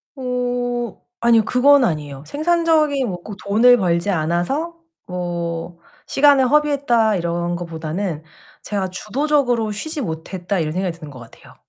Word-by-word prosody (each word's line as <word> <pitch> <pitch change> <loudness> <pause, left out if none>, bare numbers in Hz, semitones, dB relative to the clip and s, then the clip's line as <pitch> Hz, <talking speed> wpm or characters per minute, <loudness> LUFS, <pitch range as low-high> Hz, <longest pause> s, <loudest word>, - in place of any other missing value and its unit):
어 245 -2 -2 0.2
아니요 230 -2 +5
그건 275 +2 +5
아니에요. 150 - -2
'생산적인 310 -4 +1
뭐 175 -1 -6
꼭 210 - -8
돈을 230 +5 +4
벌지 175 0 +1
않아서 175 - -1 0.3
뭐 170 -1 -4 0.3
시간을 280 -2 +4
허비했다.' 275 -8 +2
이런 170 0 -2
것보다는 165 0 -4 0.4
'제가 195 -3 -3
주도적으로 245 +2 0
쉬지 305 +8 -4
못했다.' 175 +1 -4
이런 155 -1 -1
생각이 180 -2 -2
드는 155 -3 -9
것 130 - -12
같아요. 115 -1 -15
210 Hz, 310 characters per minute, -20 LUFS, 170-265 Hz, 0.4 s, 아니요